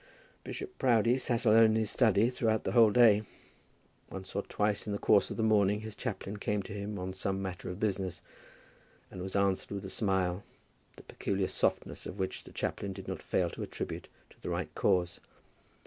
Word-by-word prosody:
Bishop 385 -2 -7
Proudie 120 +1 +3
sat 120 -2 -1
alone 115 +1 +7
in 110 0 +3
his 110 -2 +1
study 110 -1 +3
throughout 110 -3 0
the - - -1
whole 115 -3 +7
day. 110 -2 +6 0.9
Once 95 -1 -8
or 100 - 0
twice 105 +1 -1
in 105 - -2
the - - -1
course 100 0 +4
of - - -5
the 110 - 0
morning 105 -1 +3
his 110 -1 -7
chaplain 105 -4 -4
came 105 0 -1
to - - -8
him 105 0 -4
on 95 0 -4
some 95 +1 -2
matter 95 -2 -5
of 90 +2 -6
business, 95 -4 -1 0.9
and 90 - -7
was 95 +1 -5
answered 100 -1 +1
with 100 -1 -5
a 95 - -5
smile, 95 -3 0 0.5
the - - -14
peculiar 95 -1 -2
softness - - -1
of 95 - -7
which 95 -1 -3
the - - -12
chaplain 100 -1 -3
did 95 0 -9
not 95 -3 -4
fail 85 -2 0
to - - -8
attribute - - -5 0.2
to - - -22
the - - -5
right - - -3
cause. 90 -1 +1
100 Hz, 195 wpm, -31 LUFS, 95-110 Hz, 0.9 s, alone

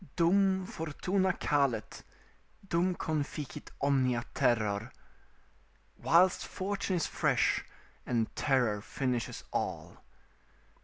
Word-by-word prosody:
"Dum 190 +2 +3
fortuna 180 +4 -1
calet, 140 -10 0 0.7
dum 180 +1 +1
conficit 150 -3 -4
omnia 130 -4 +2
terror." 110 0 +1 1.0
["Whilst 180 +3 +4
fortune 195 0 -2
is 170 - 0
fresh, - - +1 0.4
and 115 -3 0
terror 125 -7 +1
finishes 125 +1 -3
all." - - -3
145 Hz, 85 wpm, -31 LUFS, 120-180 Hz, 1.0 s, Whilst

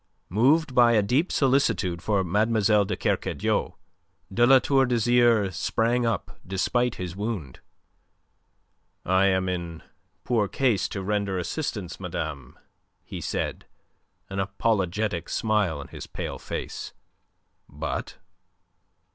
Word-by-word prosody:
Moved 135 - +3
by 120 -1 +5
a 105 -2 +4
deep 135 - +1
solicitude 125 - +1
for 100 -1 +1
Mademoiselle 105 +2 +2
de - - -3
Kercadiou, - - -1 0.6
de 120 +4 +4
La 135 +1 +8
Tour 135 0 +2
d'Azyr 120 -4 +3
sprang 120 +6 +1
up 115 -6 -3
despite 120 +6 0
his 90 -1 -5
wound. 100 - -4 1.5
"I 95 +2 +3
am 95 -1 +1
in 85 -3 -4 0.4
poor 115 -4 +1
case 120 -4 +1
to 95 - -4
render 100 -1 -1
assistance, 90 - -4
madame," 80 -7 -5 0.5
he - - -7
said, - - -3 0.6
an 95 - -5
apologetic 95 -2 -1
smile 105 -8 0
on 70 - -9
his - - -9
pale - - -5
face. - - -6 0.8
"But..." 75 +2 -5
105 Hz, 115 wpm, -26 LUFS, 90-120 Hz, 1.5 s, La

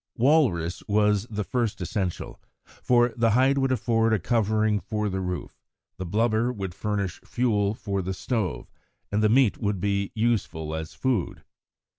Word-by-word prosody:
Walrus 115 - +2
was 105 0 +2
the 105 -1 -2
first 115 +1 -1
essential, 90 0 -3 0.2
for 120 -1 +1
the 115 -1 +2
hide 135 +2 +3
would 135 -1 +1
afford 115 -2 +2
a - - +4
covering 110 -1 +1
for 105 0 -2
the 95 0 -2
roof, 90 -1 -5 0.4
the 95 - -5
blubber 115 +5 +1
would 95 -6 -5
furnish 100 -2 -3
fuel 105 -4 0
for 100 -3 -3
the 95 +1 -4
stove, 110 - -3 0.4
and 105 +1 +1
the 110 - +4
meat 125 -1 +3
would 100 -4 -1
be 100 +1 -1
useful 100 -9 -1
as 80 0 -5
food. 125 -8 -1
105 Hz, 155 wpm, -26 LUFS, 95-115 Hz, 0.4 s, a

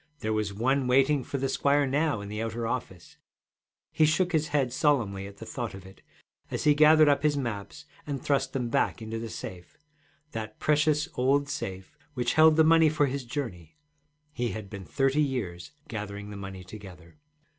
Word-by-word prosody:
There 110 0 -1
was 105 -2 -1
one 130 +6 +1
waiting 135 +2 +3
for 140 - -4
the 135 0 -1
squire 140 +2 +2
now 140 -3 0
in 100 - -7
the 105 +2 -4
outer 115 +1 -3
office; 115 -7 -5 0.7
he 155 - +2
shook 160 +4 +2
his 155 -2 +1
head 135 -4 0
solemnly 115 -10 +1
at 100 0 -13
thought 115 -1 -5
of 95 -1 -11
it, 95 - -15 0.5
as - - -3
he 150 - +5
gathered 155 +1 +6
up 145 -1 +3
his 150 -1 +2
maps 115 +2 -5 0.2
and 140 -2 -3
thrust 135 +1 0
them 125 -3 -2
back - - +1
into 110 +1 -4
the 115 0 -5
safe, 90 -4 -8 0.5
that 110 -1 -6
precious 150 +1 +2
old 140 +3 +2
safe 95 -3 -5 0.2
which 120 -1 0
held 155 0 +6
the 160 - +6
money 160 0 +6
for 150 -1 +2
his 140 0 -3
journey. 115 - -6 0.6
He 120 -3 -1
had 105 -3 -7
been 100 -3 -7
thirty 135 +1 +1
years 110 - -3 0.2
gathering 105 -4 -6
the - - -7
money 95 -2 -7
together. 90 - -12
125 Hz, 185 wpm, -28 LUFS, 105-145 Hz, 0.7 s, gathered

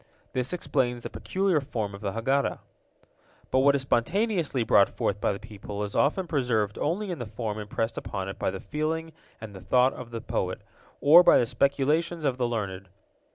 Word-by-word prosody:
This 125 0 -1
explains 125 -8 -1
the - - -6
peculiar 190 -5 0
form 110 -7 -4
of 100 - -9
the 100 -2 -3
Haggadah. 135 +5 0 0.9
But 130 - +3
what 140 +1 +5
is 135 - -1
spontaneously 165 - +1
brought 100 -3 +5
forth 105 - -2
by - - +2
the 100 - -3
people 105 0 -7
is 100 - -5
often 165 +7 +2
preserved 120 -10 0
only 185 +6 -1
in 175 - -5
the 120 - -5
form 110 -1 -4
impressed 110 +2 -3
upon 95 -1 -5
it 95 - -7
by - - 0
the 95 0 -5
feeling 155 +7 -3 0.3
and 110 -2 -9
the 95 - -10
thought 125 +7 +3
of 125 -2 -9
the 115 -1 -5
poet, 95 -4 -3 0.4
or 155 +5 +9
by - - +6
the 120 - +3
speculations 150 +6 +1
of 130 -2 0
the 120 - +1
learned. 100 -5 -4
125 Hz, 195 wpm, -27 LUFS, 105-150 Hz, 0.9 s, or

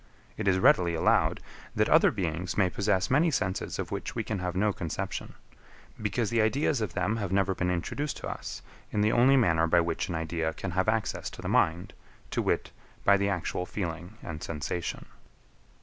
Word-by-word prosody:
It 105 - -3
is 95 -1 +4
readily 90 -2 +4
allowed, 80 - +2 0.3
that - - +3
other - - +6
beings 85 0 -3
may 95 -3 +3
possess 100 0 0
many 155 +6 +4
senses 95 -10 -2
of - - -4
which - - -4
we - - -1
can 110 -3 -3
have 90 0 -3
no 105 +2 +2
conception; 85 -4 -4 0.7
because 105 +1 -1
the 115 -1 +3
ideas 135 +3 +1
of 105 - -3
them 95 +5 0
have 100 -4 -3
never 95 0 +2
been 90 -1 -1
introduced 130 - -2
to - - -6
us - - -6 0.3
in 105 - 0
the 105 +1 +3
only 130 +3 +5
manner 85 -9 +3
by 85 +1 +4
which 85 +1 -1
an 90 - -2
idea 80 0 -2
can 90 - -4
have 95 +4 +1
access 110 -1 -1
to - - -11
the - - -3
mind, 85 +4 +1 0.4
to - - 0
wit, - - 0 0.3
by 100 - +7
the 100 0 +1
actual 90 -1 -2
feeling 90 +1 -5
and 75 -2 -6
sensation. 80 +2 -4
95 Hz, 195 wpm, -28 LUFS, 85-105 Hz, 0.7 s, by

